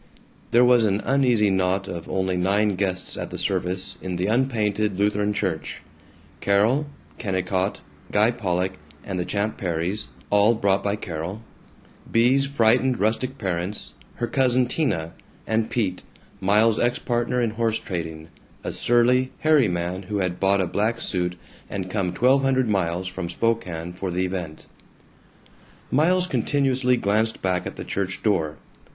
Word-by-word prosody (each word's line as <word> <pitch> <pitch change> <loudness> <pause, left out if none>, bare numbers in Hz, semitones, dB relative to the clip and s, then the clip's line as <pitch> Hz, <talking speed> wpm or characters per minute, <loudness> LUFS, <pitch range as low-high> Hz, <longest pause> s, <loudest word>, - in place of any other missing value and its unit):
There 120 +1 +5
was 125 -2 +5
an 100 -1 +2
uneasy 125 -6 +3
knot 95 +1 +1
of 85 -3 -6
only 95 -1 0
nine 100 +3 +2
guests 95 -1 -2
at - - -4
the - - -6
service 90 +1 -2
in 95 -1 -4
the 90 +1 -1
unpainted 110 -4 +1
Lutheran 105 +1 +1
Church 95 -6 -3 0.6
Carol, 110 +9 +2 0.3
Kennicott, 95 -1 -1 0.3
Guy 105 +3 +4
Pollock, 95 -5 -1 0.3
and 95 -2 -4
the 90 - -1
Champ 105 +3 -2
Perrys, 85 -2 -2 0.2
all 105 +3 +5
brought 100 -2 +1
by 100 0 0
Carol; 90 +3 -5 0.7
Bea's 130 +4 +4
frightened 125 -1 +2
rustic 120 +6 0
parents, 95 -1 -3 0.2
her 120 - -1
cousin 130 0 +2
Tina, 120 - -1 0.3
and 110 0 0
Pete, 95 -6 -1 0.4
Miles's 105 +4 +3
ex 120 +1 +1
partner 120 +1 -1
in 115 -2 +1
horse 115 0 0
trading, 80 -4 -5 0.3
a - - -3
surly, 125 +2 +3
hairy 155 -6 +4
man 90 +1 -2
who 105 - -1
had 90 -2 -1
bought 100 0 +3
a - - +1
black 110 +6 0
suit 90 -2 -2 0.3
and 95 -2 -4
come 95 -4 0
twelve 125 +9 +3
hundred 130 -2 +2
miles 90 -3 0
from 95 -2 -5
Spokane 90 -5 -1
for 95 +1 -4
the 90 +1 0
event. 90 -4 -5 1.3
Miles 180 +6 +3
continuously 130 -7 +1
glanced 110 +1 0
back 90 -2 0
at - - -7
the - - -7
church 95 -2 -3
door. 80 -8 +1
100 Hz, 150 wpm, -24 LUFS, 90-120 Hz, 1.3 s, There